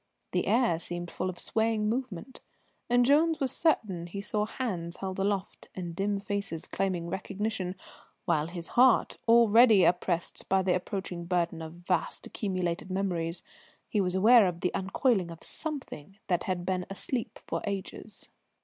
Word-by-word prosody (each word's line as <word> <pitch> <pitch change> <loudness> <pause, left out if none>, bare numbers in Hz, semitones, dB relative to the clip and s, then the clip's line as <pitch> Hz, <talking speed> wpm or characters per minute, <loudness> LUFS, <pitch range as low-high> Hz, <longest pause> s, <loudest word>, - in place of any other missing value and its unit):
The - - 0
air 230 -9 +3
seemed 175 0 -5
full 185 - -2
of 180 - -6
swaying 220 -1 0
movement, 245 -1 -4 0.5
and 245 0 +4
Jones 310 +4 +4
was 265 -3 +1
certain 195 - 0
he 195 +3 -6
saw 210 +1 -1
hands 180 -9 -4
held 190 -1 -4
aloft 195 0 -2
and 175 -3 -5
dim 200 +2 0
faces 200 -5 -3
claiming 185 -3 -2
recognition, 190 +1 -3 0.5
while 155 -4 +2
in 170 - -11
his 170 -1 -5
heart, 250 0 +4
already 230 -2 +7
oppressed 175 -1 0
by 190 0 +3
the 185 -1 +2
approaching 180 -2 -3
burden 170 -2 0
of 160 0 -7
vast - - 0
accumulated 185 -4 -2
memories, 180 -3 -2 0.4
he 210 - +1
was 180 -1 0
aware 220 +2 +7
of 175 -1 -4
the 180 - 0
uncoiling 195 0 +1
of 165 -1 -10
something 265 - -6
that 175 -2 0
had 180 -2 -2
been 185 -1 -1
asleep 225 +5 -3
for - - -3
ages. 200 +1 -5
190 Hz, 160 wpm, -29 LUFS, 175-220 Hz, 0.5 s, already